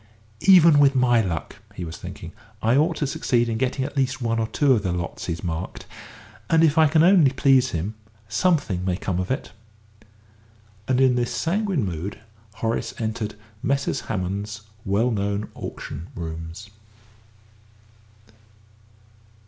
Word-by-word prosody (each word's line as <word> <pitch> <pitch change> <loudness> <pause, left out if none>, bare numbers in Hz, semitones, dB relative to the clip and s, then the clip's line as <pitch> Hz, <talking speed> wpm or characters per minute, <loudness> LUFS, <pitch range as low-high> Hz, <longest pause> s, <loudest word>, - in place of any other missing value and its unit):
"Even 170 -6 +8
with 140 -1 +5
my 120 -2 +4
luck," 85 -6 -4 0.2
he 90 - -5
was 80 - -7
thinking, - - -9 0.3
"I 115 +3 +2
ought 160 +4 +3
to 150 - -1
succeed 120 -3 +1
in 110 -1 -2
getting 130 +1 0
at 145 - -7
least 135 -1 0
one 115 -2 0
or 110 - 0
two 140 +3 +3
of 115 - +1
the 95 -3 -1
lots 85 -1 -4
he's 85 +1 -4
marked; 85 +1 -4 0.6
and 165 0 +4
if 155 -2 +4
I 160 -1 +6
can 155 +2 +4
only 175 -5 +6
please 130 -1 +3
him, 90 +4 -3 0.3
something 145 - +1
may 90 -1 0
come 95 -3 -2
of 95 - -3
it." 130 - -3 1.4
And 130 -1 +2
in 130 -1 +5
this 120 -1 0
sanguine 185 - 0
mood 90 +2 -4 0.4
Horace 115 +1 -2
entered 110 -1 -3 0.3
Messrs. 140 0 0
Hammond's 100 +4 -3 0.2
well 105 +6 +1
known 100 0 -2
auction 80 +5 -7
rooms. 85 +4 -7
115 Hz, 150 wpm, -23 LUFS, 95-140 Hz, 1.4 s, Even